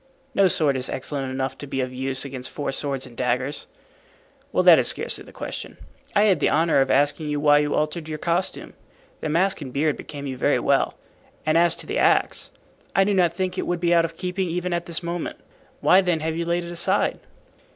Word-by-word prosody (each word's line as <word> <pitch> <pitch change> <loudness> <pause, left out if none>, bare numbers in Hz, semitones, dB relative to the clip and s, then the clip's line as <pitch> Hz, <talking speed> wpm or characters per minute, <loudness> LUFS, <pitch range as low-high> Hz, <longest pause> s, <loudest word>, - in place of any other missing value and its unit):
"No 200 -4 +4
sword 150 -6 +2
is 130 - -1
excellent 135 0 -3
enough 130 0 -3
to 145 - -7
be 135 - -3
of 130 -1 -2
use 130 +1 -2
against 130 -2 -6
four 145 - -3
swords 135 -1 -2
and 125 -2 -13
daggers." 125 +3 -1 0.8
"Well, - - +2
that - - +8
is - - +3
scarcely - - 0
the - - -14
question. - - -7 0.4
I 205 - +5
had 195 -7 +3
the - - +2
honor 160 -3 +3
of 135 - +1
asking 145 +2 +2
you 145 0 -1
why 145 0 +5
you 145 0 0
altered 155 +1 -2
your 155 - -3
costume. 170 +4 -2 0.5
The 155 - -3
mask 180 +3 +1
and 135 -3 -6
beard 145 +3 0
became 145 -1 -8
you 130 -2 -4
very - - +2
well, - - +1 0.5
and 155 0 +2
as 170 0 +4
to - - -5
the 420 +4 -2
axe, - - +2 0.5
I 195 - +5
do 205 +1 +1
not 175 -3 +3
think 185 +1 -2
it - - -3
would 175 -1 -1
be 175 0 +2
out 170 -1 +5
of 165 0 -4
keeping 180 0 -2
even 180 +1 -2
at 170 0 -2
this 170 0 -1
moment. 170 0 -4 0.4
Why, 185 - +6
then, 175 -4 0
have 160 0 -2
you 170 +1 -2
laid 170 +1 -1
it 170 - -7
aside?" 175 +3 +1
160 Hz, 225 wpm, -23 LUFS, 140-175 Hz, 0.8 s, that